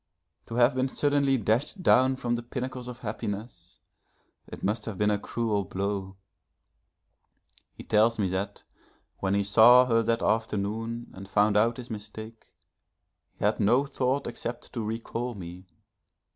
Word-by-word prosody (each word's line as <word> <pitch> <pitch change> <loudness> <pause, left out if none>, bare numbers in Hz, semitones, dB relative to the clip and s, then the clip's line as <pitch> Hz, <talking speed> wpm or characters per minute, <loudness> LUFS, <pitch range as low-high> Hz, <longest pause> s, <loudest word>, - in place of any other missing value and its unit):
To 115 - -6
have 120 +3 +4
been 130 +1 0
suddenly 140 0 +1
dashed 120 - 0
down 130 -3 +5
from 120 -2 -2
the 120 - -1
pinnacles 125 +1 -5
of 125 0 -8
happiness, 105 -3 -6 0.7
it - - -10
must 105 +2 -1
have 110 -4 -5
been 105 +1 +2
a 105 - 0
cruel 110 -2 -1
blow. 95 0 -3 1.6
He - - -10
tells 110 +2 +3
me 100 -3 +1
that 95 +2 -4 0.6
when 95 0 0
he 100 - +2
saw 115 +5 +7
her 115 -2 +3
that 115 +1 0
afternoon 115 +2 -1
and 95 +1 -10
found 105 +1 +3
out 115 +3 +3
his 125 -1 -8
mistake, 110 +1 -9 0.9
he - - -2
had - - +1
no 120 +7 +3
thought 135 0 -1
except 120 0 -6
to 115 - -3
recall 115 +2 -4
me. 90 0 -9
115 Hz, 150 wpm, -27 LUFS, 105-125 Hz, 1.6 s, saw